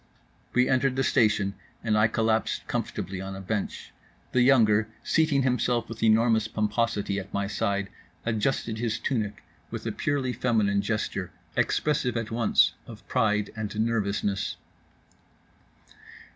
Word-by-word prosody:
We 125 0 +4
entered 130 0 +2
the 135 - +1
station 105 -5 +2 0.3
and 110 -2 +1
I 105 +1 +5
collapsed 110 0 0
comfortably 95 -1 -3
on 95 0 -5
a - - -7
bench; 100 +2 -4 0.4
the 125 - +3
younger, 110 -5 +5 0.2
seating 155 -4 +2
himself 125 -2 +1
with 115 -1 -8
enormous 110 0 +4
pomposity 105 -2 0
at 100 +1 -9
my 100 0 -1
side, 100 -1 -1 0.4
adjusted 110 0 -1
his 115 -1 -1
tunic 110 -5 -2 0.3
with - - -6
a - - -1
purely 135 -3 -1
feminine 105 -6 +1
gesture 100 -3 -2 0.3
expressive 140 -5 +1
at 115 -1 -3
once 115 -1 +3
of 110 -2 -12
pride 105 -4 +1
and 110 -1 -4
nervousness. 105 -3 0
110 Hz, 130 wpm, -27 LUFS, 105-120 Hz, 0.4 s, I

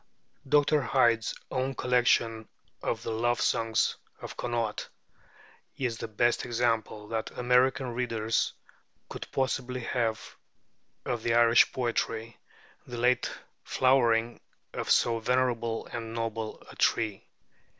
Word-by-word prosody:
Dr. 150 +1 +4
Hyde's 115 -3 +2 0.2
own 130 +1 -1
collection 120 -3 +2 0.3
of 115 - -2
the - - -3
'Love 120 +2 +1
Songs 115 -1 +1 0.2
of - - -8
Connacht' 115 -3 -2 0.9
is 120 -4 -2
the - - -4
best 120 +2 +1
example 115 -3 -1
that 110 -1 -2
American 125 +1 +2
readers 115 -2 0 0.6
could - - -7
possibly 130 -1 -1
have 115 -2 -2 0.7
of 120 -2 -2
this 115 - 0
Irish 115 0 +6
poetry, 115 -2 -2 0.5
the 120 - -6
late 125 +1 +2 0.3
flowering 120 -3 +2 0.3
of - - -4
so 115 -1 +3
venerable 115 -1 0
and 115 -1 -6
noble 115 -1 -4
a - - -13
tree. 110 -4 0
120 Hz, 115 wpm, -29 LUFS, 115-125 Hz, 0.9 s, Irish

